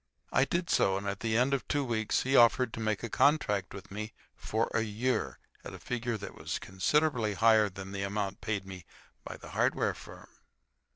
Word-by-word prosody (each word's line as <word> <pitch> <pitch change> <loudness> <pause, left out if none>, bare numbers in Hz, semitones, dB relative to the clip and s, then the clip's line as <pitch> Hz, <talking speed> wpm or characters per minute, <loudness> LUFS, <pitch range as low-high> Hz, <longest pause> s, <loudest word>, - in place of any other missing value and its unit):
I 130 - +4
did 170 +5 -2
so, 95 0 +3
and 100 +1 -5
at 100 0 -3
the 110 -1 0
end 130 +3 +2
of 140 - -1
two 145 -2 0
weeks 110 -3 0
he 135 +1 +1
offered 120 0 +5
to - - -5
make 110 -1 -1
a - - -1
contract 105 -7 +2
with 95 0 -10
me 105 +2 -5 0.2
for 110 +1 -2
a 110 - +2
year 115 +4 -1 0.3
at - - -8
a - - -11
figure 120 -2 -3
that 100 - -8
was - - -4
considerably 115 +2 0
higher 110 -1 +5
than 95 0 -9
the 100 0 -4
amount 100 0 -3
paid 100 -3 -2
me 95 -2 -9 0.4
by - - -8
the - - -12
hardware - - +1
firm. - - -14
110 Hz, 205 wpm, -30 LUFS, 100-125 Hz, 0.4 s, offered